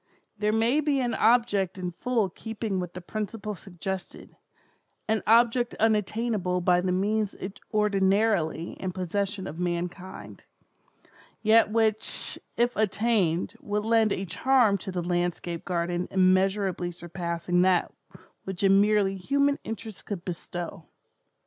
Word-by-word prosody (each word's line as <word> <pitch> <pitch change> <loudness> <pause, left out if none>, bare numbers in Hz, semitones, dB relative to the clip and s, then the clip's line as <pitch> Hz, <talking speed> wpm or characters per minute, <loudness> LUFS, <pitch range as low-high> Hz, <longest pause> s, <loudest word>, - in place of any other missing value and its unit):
There 210 0 0
may 230 +6 +3
be 290 -2 +1
an 245 -2 0
object 205 -6 +2
in 180 -1 -3
full 230 +3 0
keeping 215 +1 -4
with 180 -1 -5
the 180 - -7
principle 210 +2 -4
suggested—an 190 +3 -7
object 235 +2 +4
unattainable 215 -3 +1
by 180 0 +3
the 185 0 0
means 205 +2 0 0.4
ordinarily 195 -5 +1
in 185 -1 -3
possession 195 +2 -2
of 165 -2 -7
mankind, 175 - -5 1.0
yet 220 0 +5
which, 220 -1 0 0.2
if 240 +1 +2
attained, 205 -5 +1
would 210 +1 -2
lend 225 -2 +3
a 195 - -1
charm 220 +2 +3
to 190 - -6
the 180 -1 -3
landscape 175 -1 -2
garden 175 0 -1
immeasurably 190 -1 +2
surpassing 175 0 -2
that 185 -1 +2 0.5
which 190 0 -5
a 195 - +5
merely 200 0 +3
human 280 +8 +1
interest 220 -1 -7
could 190 -4 -5
bestow. 175 -2 -6
195 Hz, 125 wpm, -27 LUFS, 180-220 Hz, 1.0 s, yet